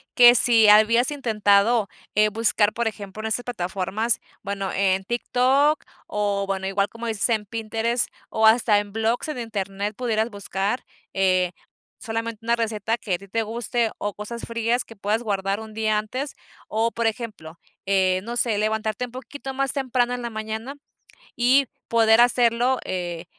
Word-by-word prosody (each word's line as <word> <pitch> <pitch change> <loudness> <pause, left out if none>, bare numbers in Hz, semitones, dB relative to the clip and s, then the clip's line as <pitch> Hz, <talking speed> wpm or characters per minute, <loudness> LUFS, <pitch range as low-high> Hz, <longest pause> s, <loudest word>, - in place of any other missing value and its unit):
que 240 -1 +9
si 230 -2 +6
habías 225 +5 +5
intentado, 220 -4 +2 0.3
eh, 215 +1 +4
buscar, 210 -1 +2
por 235 +1 -1
ejemplo, 205 -1 -6
en 220 - -3
esa 220 +2 0
plataformas, 200 +1 -1 0.2
bueno, 195 -1 -3
en 190 -1 +1
TikTok 260 +6 +2 0.2
o 205 -1 -1
bueno, 190 -1 -2
igual 200 +1 0
como 230 +1 -8
dices, 220 -3 +1
en 220 -2 0
Pinterest 225 +2 -1 0.2
o 220 0 +3
hasta 220 -2 +5
en 205 -1 -6
blogs 225 +4 0
en 305 - -4
Internet 200 -2 -4
pudieras 225 -2 0
buscar, 200 +3 -2 0.3
eh, 185 -2 +2 0.5
solamente 225 -1 -4
una 235 +1 +2
receta 225 -1 -1
que 205 -5 -4
a - - +1
ti 200 - -13
te 225 +4 -1
guste 230 +1 -1
o 205 0 -3
cosas 230 +3 -7
frías 230 +1 0
que 225 - -14
puedas 210 +3 -1
guardar 200 -2 -1
un 220 -1 -10
día 215 -1 +1
antes. 255 +7 -5 0.3
O, 225 +2 0
por 235 0 -2
ejemplo, 215 -8 -4 0.3
eh, 190 -1 +2
no 235 +2 -4
sé, 230 -3 +1
levantarte 215 +2 -1
un 245 - -13
poquito 270 +2 -8
más 270 0 0
temprano 250 -2 0
en 245 - -6
la 235 - -4
mañana 220 +4 -5 0.6
y 260 +3 +3 0.2
poder 225 0 +5
hacerlo, 245 +1 +3
eh, 175 -2 -4
220 Hz, 165 wpm, -23 LUFS, 205-235 Hz, 0.6 s, que